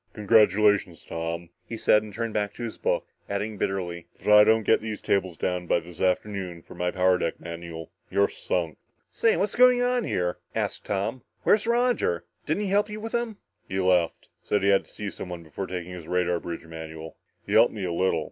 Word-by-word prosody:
"Congratulations, 105 Hz, -4 st, +3 dB
Tom," 85 Hz, +1 st, -4 dB, 0.2 s
he 115 Hz, -, -4 dB
said, 105 Hz, -1 st, +4 dB
and 105 Hz, 0 st, -9 dB
turned 115 Hz, +2 st, -3 dB
back 105 Hz, -1 st, -1 dB
to 120 Hz, -, -6 dB
his 115 Hz, -, -5 dB
book, -, -, 0 dB, 0.2 s
adding 105 Hz, +2 st, -2 dB
bitterly, 85 Hz, -3 st, -2 dB
"but -, -, -27 dB
if -, -, -8 dB
I 105 Hz, 0 st, +9 dB
don't 110 Hz, +1 st, +4 dB
get -, -, +3 dB
these 110 Hz, -1 st, -4 dB
tables 95 Hz, -4 st, 0 dB
down 90 Hz, +1 st, -2 dB
by 85 Hz, -, +3 dB
this 85 Hz, 0 st, -11 dB
afternoon 90 Hz, -2 st, -1 dB
for -, -, -13 dB
my 90 Hz, 0 st, -1 dB
power 90 Hz, 0 st, +3 dB
deck 85 Hz, -, -2 dB
manual, 85 Hz, -1 st, -7 dB, 0.2 s
you're 100 Hz, 0 st, +3 dB
sunk." 85 Hz, -5 st, -3 dB, 0.3 s
"Say 225 Hz, -, +2 dB
what's 200 Hz, +1 st, 0 dB
going 250 Hz, 0 st, +6 dB
on 245 Hz, -1 st, +1 dB
here?" 90 Hz, -, -1 dB, 0.2 s
asked -, -, -2 dB
Tom. 105 Hz, +6 st, -2 dB, 0.2 s
"Where's 210 Hz, +1 st, +3 dB
Roger? 250 Hz, -, +1 dB, 0.2 s
Didn't 210 Hz, -, 0 dB
he 200 Hz, -, -2 dB
help 205 Hz, +2 st, +2 dB
you 210 Hz, 0 st, -6 dB
with 225 Hz, +1 st, -6 dB
them?" 235 Hz, -3 st, -2 dB, 0.3 s
"He 95 Hz, -, -1 dB
left. 90 Hz, -3 st, +2 dB
Said 100 Hz, -2 st, 0 dB
he 100 Hz, -, +4 dB
had 100 Hz, -1 st, +4 dB
to -, -, -13 dB
see 105 Hz, -2 st, -5 dB
someone 90 Hz, -2 st, -7 dB
before 85 Hz, +5 st, -6 dB
taking 90 Hz, -1 st, -5 dB
his 85 Hz, -3 st, -9 dB
radar 90 Hz, -1 st, +1 dB
bridge 85 Hz, -1 st, -6 dB
manual. 80 Hz, 0 st, -8 dB, 0.3 s
He 100 Hz, -, -4 dB
helped 115 Hz, +2 st, +6 dB
me 105 Hz, -3 st, -5 dB
a 85 Hz, -, -2 dB
little. 95 Hz, +2 st, +2 dB
95 Hz, 210 wpm, -26 LUFS, 85-110 Hz, 0.3 s, I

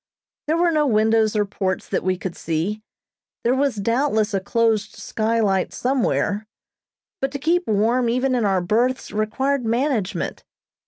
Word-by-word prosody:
There 315 Hz, +2 st, +2 dB
were 345 Hz, 0 st, +3 dB
no 305 Hz, -2 st, +2 dB
windows 220 Hz, -1 st, +3 dB
or 210 Hz, -1 st, +2 dB
ports 190 Hz, -2 st, -3 dB
that -, -, -1 dB
we 185 Hz, 0 st, 0 dB
could 180 Hz, -1 st, -5 dB
see; 170 Hz, +7 st, -2 dB, 0.6 s
there 240 Hz, -, +3 dB
was 275 Hz, -1 st, +1 dB
doubtless 220 Hz, 0 st, +1 dB
a 195 Hz, -, +2 dB
closed 220 Hz, +1 st, 0 dB
skylight 215 Hz, -4 st, 0 dB
somewhere, 220 Hz, -5 st, 0 dB, 0.7 s
but 270 Hz, -, +1 dB
to -, -, -2 dB
keep 340 Hz, +5 st, +1 dB
warm 230 Hz, +4 st, +2 dB
even 255 Hz, +2 st, +1 dB
in 245 Hz, -2 st, +1 dB
our 195 Hz, -3 st, +2 dB
berths 235 Hz, +8 st, 0 dB
required 265 Hz, +6 st, 0 dB
management. 230 Hz, -3 st, -1 dB
225 Hz, 150 wpm, -22 LUFS, 205-260 Hz, 0.7 s, were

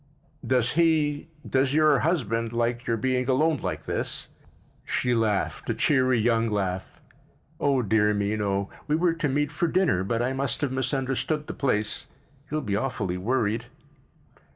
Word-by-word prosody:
"Does 125 Hz, -2 st, +2 dB
he—does 150 Hz, -3 st, +1 dB
your 155 Hz, -2 st, +5 dB
husband 115 Hz, -, 0 dB
like 120 Hz, +1 st, -1 dB
your 115 Hz, -1 st, +1 dB
being 125 Hz, +2 st, 0 dB
alone 155 Hz, +4 st, +3 dB
like -, -, -4 dB
this?" -, -, -3 dB, 0.5 s
She 125 Hz, -1 st, 0 dB
laughed, 110 Hz, -4 st, 0 dB
a -, -, +1 dB
cheery 130 Hz, -3 st, +3 dB
young 115 Hz, 0 st, +2 dB
laugh. 95 Hz, -3 st, -3 dB, 0.6 s
"Oh, 135 Hz, -3 st, +2 dB
dear 105 Hz, 0 st, +3 dB
me, 100 Hz, +1 st, 0 dB
no. 100 Hz, -2 st, -1 dB, 0.2 s
We 150 Hz, -, +2 dB
were 170 Hz, +1 st, +2 dB
to 160 Hz, -3 st, -1 dB
meet 145 Hz, +2 st, 0 dB
for 160 Hz, +4 st, 0 dB
dinner 165 Hz, -, +2 dB
but 115 Hz, +4 st, -1 dB
I 130 Hz, +2 st, 0 dB
must 135 Hz, +3 st, -1 dB
have 145 Hz, -3 st, 0 dB
misunderstood 135 Hz, +3 st, -1 dB
the -, -, -5 dB
place. 105 Hz, -6 st, 0 dB, 0.4 s
He'll 155 Hz, +1 st, -1 dB
be 105 Hz, -7 st, -2 dB
awfully 100 Hz, -6 st, -2 dB
worried." 115 Hz, +1 st, 0 dB
130 Hz, 155 wpm, -26 LUFS, 110-145 Hz, 0.6 s, your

